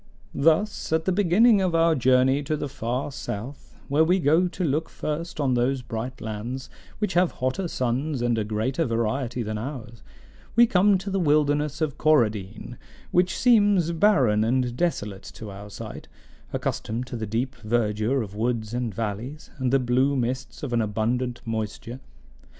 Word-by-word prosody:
"Thus, 165 Hz, +9 st, +1 dB
at 160 Hz, 0 st, +1 dB
the 190 Hz, -, +2 dB
beginning 205 Hz, +4 st, +4 dB
of 180 Hz, -3 st, +1 dB
our 165 Hz, 0 st, +4 dB
journey 130 Hz, +1 st, +3 dB
to 155 Hz, +2 st, -1 dB
the 145 Hz, -, -3 dB
far 130 Hz, +1 st, -3 dB
south, 130 Hz, +1 st, -7 dB
where 145 Hz, +3 st, +3 dB
we 180 Hz, +4 st, +3 dB
go 165 Hz, +2 st, +3 dB
to 180 Hz, +1 st, -4 dB
look 155 Hz, +1 st, 0 dB
first 155 Hz, +2 st, -4 dB
on 135 Hz, -3 st, +2 dB
those 125 Hz, +2 st, +1 dB
bright 120 Hz, +3 st, -5 dB
lands, 115 Hz, +5 st, -5 dB, 0.3 s
which 210 Hz, -3 st, -1 dB
have 175 Hz, 0 st, +3 dB
hotter 130 Hz, +9 st, -2 dB
suns 130 Hz, 0 st, -1 dB
and 120 Hz, -1 st, +2 dB
a -, -, 0 dB
greater 110 Hz, +8 st, -1 dB
variety 120 Hz, +2 st, -1 dB
than 110 Hz, 0 st, -3 dB
ours, 120 Hz, -2 st, -7 dB, 0.5 s
we 235 Hz, +1 st, +7 dB
come 200 Hz, -1 st, +4 dB
to 195 Hz, +2 st, -6 dB
the 195 Hz, -, 0 dB
wilderness 150 Hz, -2 st, +1 dB
of 155 Hz, -4 st, -1 dB
Coradine, 115 Hz, -6 st, +1 dB, 0.3 s
which 185 Hz, 0 st, +2 dB
seems 205 Hz, -8 st, +4 dB
barren 140 Hz, -, +3 dB
and 125 Hz, +1 st, 0 dB
desolate 105 Hz, -, -2 dB
to 110 Hz, -2 st, -8 dB
our 100 Hz, +1 st, -9 dB
sight, 100 Hz, -, -8 dB, 0.4 s
accustomed 115 Hz, +3 st, -3 dB
to 125 Hz, -, -7 dB
the 110 Hz, -2 st, -4 dB
deep 120 Hz, +5 st, -2 dB
verdure 115 Hz, +2 st, 0 dB
of 100 Hz, -2 st, -9 dB
woods 110 Hz, 0 st, -2 dB
and 120 Hz, -2 st, -2 dB
valleys, 115 Hz, +8 st, -5 dB
and 130 Hz, -1 st, 0 dB
the 135 Hz, -, +5 dB
blue 130 Hz, +2 st, +2 dB
mists 125 Hz, +2 st, -3 dB
of 130 Hz, -4 st, -3 dB
an 115 Hz, -, +2 dB
abundant 120 Hz, +4 st, -1 dB
moisture. 110 Hz, +2 st, -4 dB
130 Hz, 165 wpm, -25 LUFS, 115-160 Hz, 0.5 s, we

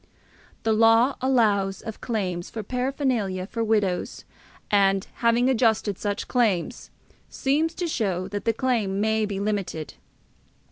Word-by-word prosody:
The 225 Hz, 0 st, +2 dB
law 225 Hz, +4 st, +4 dB
allows 210 Hz, -7 st, +2 dB
of 220 Hz, -, -7 dB
claims 185 Hz, -7 st, -3 dB
for 220 Hz, -, -6 dB
paraphernalia 250 Hz, -6 st, -1 dB
for 230 Hz, +3 st, -3 dB
widows, 210 Hz, -5 st, -1 dB, 0.5 s
and, 195 Hz, -1 st, +3 dB
having 235 Hz, +1 st, +3 dB
adjusted 220 Hz, -6 st, +1 dB
such 205 Hz, -1 st, -3 dB
claims, 215 Hz, -9 st, 0 dB, 0.4 s
seems 310 Hz, +5 st, 0 dB
to 360 Hz, -, -2 dB
show 195 Hz, -, -1 dB
that 205 Hz, +1 st, -5 dB
the 230 Hz, -, +2 dB
claim 225 Hz, -6 st, 0 dB
may 220 Hz, 0 st, +1 dB
be 200 Hz, -1 st, -4 dB
limited. 195 Hz, -7 st, -3 dB
220 Hz, 130 wpm, -25 LUFS, 195-245 Hz, 0.5 s, law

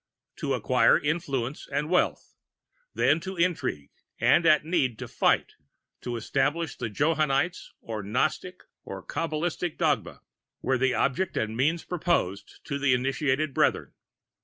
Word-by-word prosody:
"To -, -, -1 dB
acquire -, -, +4 dB
influence 145 Hz, -4 st, -2 dB
and 150 Hz, -, -1 dB
wealth, 180 Hz, +2 st, 0 dB, 0.6 s
then 155 Hz, -, +3 dB
to 190 Hz, +3 st, -6 dB
intrigue, 170 Hz, -, -1 dB, 0.3 s
and 170 Hz, -, +4 dB
at 155 Hz, -1 st, +5 dB
need 145 Hz, -9 st, 0 dB
to -, -, -6 dB
fight, -, -, +1 dB, 0.5 s
to 120 Hz, -, -4 dB
establish 140 Hz, +6 st, -1 dB
the 115 Hz, -, -4 dB
Johannite 155 Hz, -, +1 dB, 0.2 s
or 110 Hz, -2 st, -5 dB
Gnostic 155 Hz, -, -2 dB, 0.2 s
and 95 Hz, -1 st, -8 dB
Kabalistic 165 Hz, +1 st, -2 dB
dogma, -, -, 0 dB, 0.4 s
were 130 Hz, -1 st, +1 dB
the 130 Hz, -1 st, +2 dB
object 140 Hz, -, 0 dB
and 110 Hz, 0 st, -1 dB
means 155 Hz, +7 st, +1 dB
proposed 155 Hz, -, -2 dB
to 140 Hz, -2 st, -4 dB
the 135 Hz, -2 st, +3 dB
initiated 135 Hz, +3 st, 0 dB
Brethren. -, -, +1 dB
145 Hz, 135 wpm, -27 LUFS, 125-165 Hz, 0.6 s, at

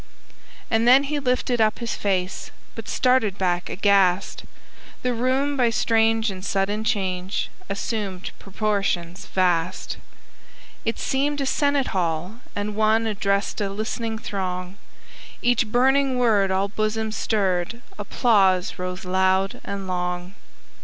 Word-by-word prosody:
And 225 Hz, +1 st, +3 dB
then 260 Hz, +3 st, +7 dB
he 290 Hz, +1 st, -2 dB
lifted 250 Hz, -2 st, 0 dB
up 215 Hz, -1 st, +3 dB
his 235 Hz, -2 st, -3 dB
face, 185 Hz, -2 st, -2 dB, 0.2 s
But 225 Hz, -, -8 dB
started 250 Hz, -6 st, +2 dB
back 175 Hz, -2 st, 0 dB
aghast, 195 Hz, -2 st, +2 dB, 0.6 s
The 250 Hz, 0 st, +1 dB
room, 260 Hz, +4 st, +1 dB
by 245 Hz, -3 st, +3 dB
strange 225 Hz, -1 st, +2 dB
and 185 Hz, -1 st, -8 dB
sudden 200 Hz, +2 st, 0 dB
change, 190 Hz, -4 st, -1 dB, 0.2 s
Assumed 200 Hz, -2 st, -3 dB
proportions 195 Hz, -4 st, -2 dB
vast. 180 Hz, -2 st, 0 dB, 0.9 s
It 225 Hz, -, -1 dB
seemed 285 Hz, +2 st, 0 dB
a 275 Hz, -, 0 dB
Senate 285 Hz, 0 st, +1 dB
hall, 180 Hz, +4 st, -2 dB, 0.2 s
and 205 Hz, 0 st, -3 dB
one 220 Hz, +1 st, +3 dB
Addressed 200 Hz, -1 st, -1 dB
a 200 Hz, -, 0 dB
listening 220 Hz, +2 st, -3 dB
throng; 185 Hz, -3 st, -4 dB, 0.7 s
Each 245 Hz, -1 st, +3 dB
burning 265 Hz, +3 st, +3 dB
word 215 Hz, -6 st, +3 dB
all 190 Hz, +1 st, +1 dB
bosoms 215 Hz, +1 st, -2 dB
stirred, 200 Hz, +1 st, -1 dB, 0.2 s
Applause 195 Hz, -5 st, +2 dB
rose 180 Hz, +1 st, -4 dB
loud 190 Hz, +1 st, +1 dB
and 200 Hz, -1 st, -5 dB
long. 180 Hz, 0 st, -3 dB
205 Hz, 125 wpm, -23 LUFS, 185-235 Hz, 0.9 s, then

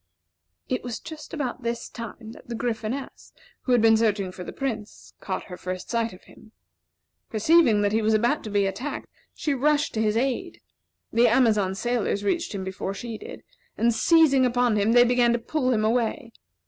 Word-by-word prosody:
It 255 Hz, -, -2 dB
was 240 Hz, -2 st, -5 dB
just 315 Hz, -2 st, -10 dB
about 270 Hz, -5 st, -3 dB
this 235 Hz, 0 st, -3 dB
time 230 Hz, -1 st, -8 dB
that -, -, -14 dB
the 235 Hz, -, -4 dB
Gryphoness, 235 Hz, +3 st, -4 dB, 0.3 s
who 255 Hz, -, 0 dB
had 240 Hz, -2 st, +4 dB
been 225 Hz, 0 st, +6 dB
searching 210 Hz, -4 st, +1 dB
for 180 Hz, -, -8 dB
the -, -, -7 dB
Prince, 225 Hz, -6 st, -5 dB
caught -, -, -4 dB
her 180 Hz, -3 st, -9 dB
first 185 Hz, +1 st, -6 dB
sight 230 Hz, -1 st, 0 dB
of 185 Hz, -, -14 dB
him. 220 Hz, -, -18 dB, 0.8 s
Perceiving 225 Hz, -1 st, +4 dB
that 205 Hz, -, +2 dB
he 220 Hz, +1 st, +1 dB
was 220 Hz, 0 st, +2 dB
about 240 Hz, +8 st, +1 dB
to -, -, -4 dB
be 205 Hz, -1 st, +2 dB
attacked, 250 Hz, +9 st, -4 dB, 0.3 s
she 295 Hz, -, -1 dB
rushed 295 Hz, +2 st, +1 dB
to 220 Hz, -, -1 dB
his 215 Hz, 0 st, +1 dB
aid. 270 Hz, +8 st, -2 dB, 0.5 s
The 235 Hz, +2 st, +5 dB
Amazon 210 Hz, -7 st, +3 dB
sailors 220 Hz, -2 st, -1 dB
reached 275 Hz, +3 st, -1 dB
him 190 Hz, -, -4 dB
before 190 Hz, +1 st, -4 dB
she 230 Hz, 0 st, -6 dB
did, -, -, -10 dB, 0.3 s
and 235 Hz, 0 st, +3 dB
seizing 290 Hz, +1 st, +4 dB
upon 245 Hz, -2 st, +2 dB
him 210 Hz, +2 st, +2 dB
they 245 Hz, 0 st, +7 dB
began 245 Hz, -1 st, +3 dB
to -, -, +2 dB
pull 255 Hz, +2 st, -1 dB
him 215 Hz, -3 st, +1 dB
away. 230 Hz, +2 st, -1 dB
230 Hz, 190 wpm, -25 LUFS, 215-255 Hz, 0.8 s, they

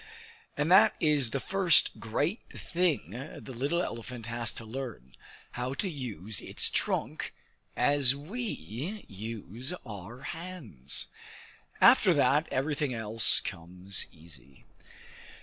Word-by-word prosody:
And 150 Hz, +4 st, +1 dB
that 190 Hz, +2 st, +7 dB
is 150 Hz, -6 st, +4 dB
the 135 Hz, -, -1 dB
first 190 Hz, +1 st, +4 dB
great 145 Hz, -, 0 dB
thing 165 Hz, -, -1 dB, 0.3 s
the 130 Hz, -, -9 dB
little 145 Hz, +9 st, 0 dB
elephant 115 Hz, 0 st, -6 dB
has 115 Hz, 0 st, -2 dB
to 115 Hz, -, -6 dB
learn 110 Hz, -, -6 dB, 0.4 s
how 125 Hz, +2 st, -3 dB
to 195 Hz, -, 0 dB
use 110 Hz, -, -2 dB
its -, -, 0 dB
trunk -, -, -1 dB, 0.4 s
as 135 Hz, 0 st, +4 dB
we 170 Hz, -, -6 dB, 0.7 s
use 110 Hz, -, -6 dB
our 110 Hz, +3 st, -8 dB
hands. 140 Hz, -, -6 dB, 0.7 s
After -, -, +7 dB
that -, -, +4 dB
everything 140 Hz, -1 st, 0 dB
else 110 Hz, 0 st, +2 dB
comes 90 Hz, +3 st, -5 dB
easy. 70 Hz, -5 st, -11 dB
125 Hz, 115 wpm, -30 LUFS, 105-150 Hz, 0.7 s, that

